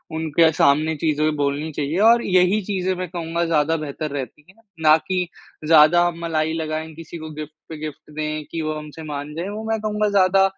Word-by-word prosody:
उनके 160 0 +3
सामने 155 +1 +3
चीज़ें 155 0 0
बोलनी 145 +2 -1
चाहिए 150 +3 -2
और 235 0 +4
यही 185 +3 +3
चीज़ें 185 -1 0
मैं 180 0 -4
कहूँगा 170 -1 -2
ज़्यादा 160 -1 +2
बेहतर 150 0 -5
रहती 140 +1 -6
हैं, 195 - -19 0.3
ना 155 0 +6
कि 185 -1 0 0.4
ज़्यादा 165 +2 +6
मलाई 160 -2 -2
लगाएँ, 160 0 -3
किसी 165 +1 -9
को 160 -1 -8
गिफ्ट 155 0 -7 0.2
पे 160 - -7
गिफ्ट 150 0 -9
दें 155 0 -3
कि 165 - -3
वो 155 0 -2
हमसे 150 +1 -10
मान 145 +1 -5
जाए। 175 +4 -4
वो 215 +2 -5
मैं 225 0 0
कहूँगा 210 0 0
ज़्यादा 195 -1 +4
160 Hz, 195 wpm, -22 LUFS, 155-180 Hz, 0.4 s, ना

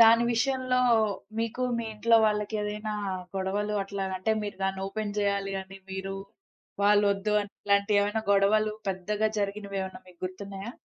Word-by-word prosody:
దాని 230 +1 +8
విషయంలో 255 +1 +1 0.6
మీకు 230 +2 -1 0.2
మీ 230 - -2
ఇంట్లో 230 +2 +4
వాళ్ళకి 210 0 0
ఏదైనా 210 +1 -3 0.4
గొడవలు 200 +2 -1
అట్లా 195 0 -4
అంటే 220 +4 +1
మీరు 205 -2 -5
దాన్ని 190 0 -1
ఓపెన్ 205 0 -3
జేయాలి 200 -1 0
అండి 195 +1 -12
మీరు, 190 0 -4 0.7
వాళ్ళొద్దు 205 0 +3
అని 205 - -9 0.2
ఇలాంటియి 200 +1 +4
ఏమైనా 210 +2 -1
గొడవలు 210 +2 +4 0.2
పెద్దగా 205 +3 -1
జరిగినవేమన్నా 200 +1 -3
మీకు 180 -1 -18
గుర్తున్నయా? 195 +3 -7
205 Hz, 140 wpm, -28 LUFS, 195-215 Hz, 0.7 s, దాని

